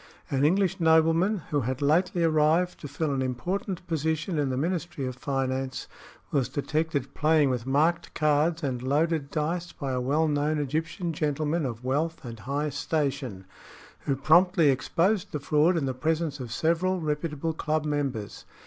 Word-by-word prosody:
"An 135 0 +1
English 190 +4 +2
nobleman 165 +4 +3
who 145 -1 +2
had 130 +2 -2
lately 170 +5 +2
arrived 160 +3 +2
to 145 - -7
fill 145 +2 -2
an 135 - -1
important 180 +9 -3
position 160 +1 -1
in 140 -2 +1
the 130 - -2
Ministry 170 -2 -2
of 130 -1 -4
Finance 130 -1 -2 0.4
was 135 -4 +1
detected 150 -1 -2
playing 155 -3 +3
with 125 -1 -3
marked 160 +5 +1
cards 155 +2 +2
and 130 -3 -2
loaded 145 +2 0
dice 170 +3 -2
by 140 -2 -4
a 125 -1 -1
well 150 +5 +1
known 150 +1 +1
Egyptian 160 +4 -2
gentleman 150 +1 -1
of 115 -1 -7
wealth 150 +4 -1
and 115 -2 -7
high 145 +5 -2
station, 135 - -2 0.5
who 140 - -1
promptly 165 +2 +4
exposed 170 +9 0
the 150 - -1
fraud 150 +5 +3
in 150 - 0
the 130 - -1
presence 155 +2 -1
of 125 -3 -6
several 170 +7 +1
reputable 155 0 -2
club 155 -1 -1
members. 140 -8 -3
150 Hz, 160 wpm, -27 LUFS, 135-165 Hz, 0.5 s, promptly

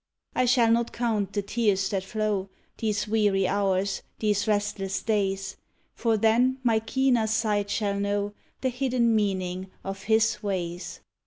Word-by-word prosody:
I 255 - +3
shall 240 -2 +4
not 235 0 +2
count 220 -5 -1
the 205 - -2
tears 200 -2 +1
that 195 -2 -1
flow 205 -1 -2 0.3
These 210 -2 -1
weary 205 -3 +2
hours, 195 0 0 0.2
these 210 -1 0
restless 205 -2 -1
days; 195 -3 -1 0.4
For 225 -2 +1
then 235 +4 +3
my 230 -3 +3
keener 240 0 +1
sight 215 -2 0
shall 200 -1 -1
know 200 0 -1 0.3
The 260 - +1
hidden 250 -2 +1
meaning 190 -3 -1
of 195 0 -6
His 220 -1 +2
ways! 180 -4 -4
210 Hz, 145 wpm, -26 LUFS, 195-225 Hz, 0.4 s, shall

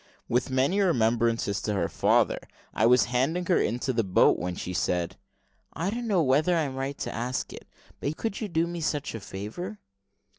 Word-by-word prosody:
With 125 +2 +1
many 135 +9 +2
remembrances 115 - +2
to 105 - -1
her 85 -4 +1
father, - - +2 0.3
I 110 - +3
was 125 +1 +6
handing 155 +9 +1
her 180 - +3
into 125 +4 0
the 115 -1 +1
boat, 95 -2 +4
when 90 +1 -3
she 90 - -5
said, 90 -1 -1 0.6
"I 175 +5 -2
don't 235 +1 -3
know 190 -6 +3
whether 150 +6 +3
I 165 - +2
am 135 -3 -3
right 135 +1 -3
to - - -4
ask 125 +3 -3
it, - - -11 0.3
but - - -1
you 155 - -4
could 215 -1 -3
do 165 0 +2
me 170 0 -5
such 145 -2 -2
a 115 - -5
favour." 110 - -6
130 Hz, 195 wpm, -27 LUFS, 115-170 Hz, 0.6 s, was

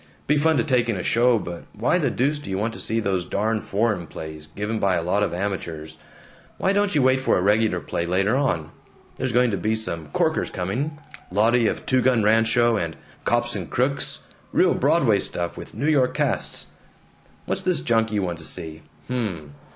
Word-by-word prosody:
Be 150 - +2
fun 160 +1 +3
to 120 - +2
take 125 -5 +1
in 110 - 0
a 90 - -4
show, 120 +1 +3
but 85 -4 -6
why 120 - +1
the 145 -6 +1
deuce 140 +5 0
do 145 - -9
you 95 - -1
want 110 +3 -1
to - - -7
see 115 - 0
those 95 -4 0
darn 110 +4 -1
foreign 100 -4 -1
plays, 80 -1 -8
given 105 +2 -2
by 95 -2 +2
a 85 - -1
lot 95 +4 +1
of 105 - +1
amateurs? 85 -4 -4 0.6
Why 190 - +1
don't 205 -2 +1
you 145 - +4
wait 130 0 +3
for 130 - +2
a - - +1
regular 105 -2 +2
play, 85 0 -3
later 95 +6 +2
on? 85 - 0 0.5
There's 130 -1 -1
going 120 0 +3
to 100 - -1
be 110 +4 0
some 85 -8 -3
corkers - - 0
coming: 125 - -3 0.3
'Lottie 115 +4 +3
of - - -3
Two 130 -1 +2
Gun 125 -3 +3
Rancho,' 115 +2 +3
and 85 -4 -3 0.3
'Cops 120 0 +1
and - - -5
Crooks' 130 +3 0 0.3
real - - +4
Broadway - - +3
stuff, 85 -1 -3
with - - -10
the - - -12
New 140 +6 -1
York 130 -5 +2
casts. - - -1 0.7
What's - - -2
this - - +1
junk 115 +6 +1
you 105 -2 0
want 85 -2 -3
to - - -7
see? 80 0 -6 0.3
Hm. 95 - -3
110 Hz, 205 wpm, -23 LUFS, 90-125 Hz, 0.7 s, you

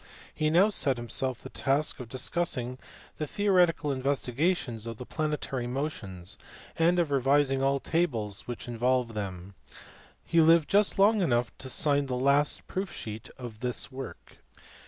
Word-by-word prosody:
He 155 0 0
now 180 +7 +5
set 140 - +1
himself 125 +1 -2
the - - -8
task 140 +3 0
of 125 -3 -8
discussing 130 -2 -1 0.4
the 155 - -2
theoretical 180 -5 +2
investigations 135 - -1
of 115 -1 -6
the 125 - -7
planetary 145 -5 -2
motions 110 - -4 0.4
and 170 +2 +3
of 170 -4 +1
revising 135 0 +3
all 135 +1 +2
tables 115 - -1
which 120 -1 -6
involved 120 0 0
them. 95 -2 -5 0.7
He 165 -1 +4
lived 165 -1 +5
just 205 +1 +4
long 205 +2 +5
enough 120 -8 +1
to 130 - -7
sign 145 0 +2
the 125 - -2
last 140 +3 +2
proof 190 0 -4
sheet 110 0 -7
of 120 -4 -8
this 125 +3 -1
work. 130 - -9
135 Hz, 150 wpm, -29 LUFS, 120-155 Hz, 0.7 s, now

